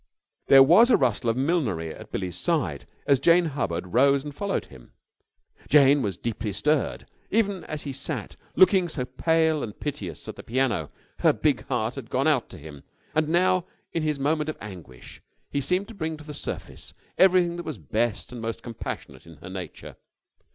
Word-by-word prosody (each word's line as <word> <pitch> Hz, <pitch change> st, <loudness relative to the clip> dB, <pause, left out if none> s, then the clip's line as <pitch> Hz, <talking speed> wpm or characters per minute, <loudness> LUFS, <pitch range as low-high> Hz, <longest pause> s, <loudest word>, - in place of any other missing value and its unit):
There 135 Hz, -1 st, +9 dB
was 180 Hz, -, +6 dB
a -, -, +6 dB
rustle 120 Hz, -3 st, +1 dB
of 115 Hz, -, 0 dB
millinery 130 Hz, -, 0 dB
at -, -, -12 dB
Billie's 90 Hz, -3 st, -3 dB
side 90 Hz, -, -1 dB, 0.2 s
as 140 Hz, -2 st, +4 dB
Jane 170 Hz, +4 st, +5 dB
Hubbard 95 Hz, -, -3 dB
rose 140 Hz, +2 st, +4 dB
and 145 Hz, -1 st, -7 dB
followed 200 Hz, +6 st, -2 dB
him. 65 Hz, -3 st, -16 dB, 0.8 s
Jane 140 Hz, -1 st, +6 dB
was 100 Hz, -7 st, -2 dB
deeply 110 Hz, -2 st, -3 dB
stirred. 150 Hz, +8 st, 0 dB, 0.2 s
Even 200 Hz, -4 st, +1 dB
as 155 Hz, -1 st, -5 dB
he 140 Hz, -, -5 dB
sat, 135 Hz, -4 st, -4 dB, 0.2 s
looking 185 Hz, -1 st, +5 dB
so 130 Hz, -5 st, -2 dB
pale 160 Hz, +4 st, +1 dB
and 105 Hz, -3 st, -6 dB
piteous, 100 Hz, -, -5 dB
at -, -, -7 dB
the -, -, -7 dB
piano, 115 Hz, -, 0 dB, 0.3 s
her -, -, +5 dB
big -, -, 0 dB
heart -, -, -1 dB
had -, -, -8 dB
gone -, -, +1 dB
out -, -, +2 dB
to -, -, -10 dB
him, 70 Hz, -1 st, -11 dB, 0.3 s
and 155 Hz, 0 st, +1 dB
now, 185 Hz, +1 st, +2 dB, 0.3 s
in 165 Hz, -, 0 dB
his 155 Hz, -1 st, 0 dB
moment 150 Hz, +2 st, 0 dB
of 155 Hz, -, -4 dB
anguish, 85 Hz, -12 st, -11 dB, 0.3 s
he 140 Hz, -, 0 dB
seemed 180 Hz, +8 st, 0 dB
to -, -, -9 dB
bring 160 Hz, -5 st, -4 dB
to 155 Hz, -, -12 dB
the 150 Hz, 0 st, -8 dB
surface -, -, -7 dB, 0.2 s
everything 180 Hz, -2 st, +5 dB
that 175 Hz, -, -5 dB
was 155 Hz, -7 st, -5 dB
best 105 Hz, -, -2 dB
and 120 Hz, -2 st, -7 dB
most 115 Hz, 0 st, -4 dB
compassionate 85 Hz, -, -7 dB
in 85 Hz, -, -12 dB
her 90 Hz, +5 st, -11 dB
nature. 90 Hz, -4 st, -8 dB
140 Hz, 185 wpm, -25 LUFS, 105-160 Hz, 0.8 s, There